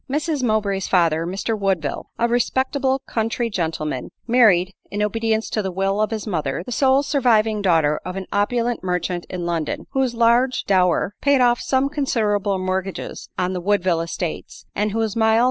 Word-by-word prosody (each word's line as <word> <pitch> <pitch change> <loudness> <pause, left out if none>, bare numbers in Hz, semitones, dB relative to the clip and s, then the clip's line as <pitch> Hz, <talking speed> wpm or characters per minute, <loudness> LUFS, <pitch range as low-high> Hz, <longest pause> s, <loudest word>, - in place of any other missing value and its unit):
Mrs 300 +1 -1
Mowbray's 210 -5 0
father, 165 -3 +2
Mr 195 +5 -2
Woodville, 190 -8 -2
a 235 - +2
respectable 260 +2 0
country 230 +1 -2
gentleman, 160 -7 -3 0.2
married, 205 -7 +4 0.2
in 205 +1 -2
obedience 220 +1 0
to 215 - 0
the 190 -2 -3
will 195 +3 0
of 215 - +1
his 220 -2 -4
mother, 160 -6 -2
the - - -7
sole 265 +3 +3
surviving 225 -7 +2
daughter 160 -6 +2
of 185 - -6
an 195 -1 -4
opulent 235 +3 0
merchant 180 -1 -2
in 180 -2 -4
London, 165 -3 -2
whose 265 -3 0
large 235 +3 +3
dower 185 0 +2
paid 280 -1 +3
off 240 -1 +3
some 265 +1 +1
considerable 215 -9 0
mortgages 185 0 -4
on 180 0 0
the 180 - -3
Woodville 185 -3 +1
estates, 165 0 -5
and 210 +1 -1
whose 220 -1 -1
mild 220 0 +3
210 Hz, 165 wpm, -21 LUFS, 185-240 Hz, 0.2 s, married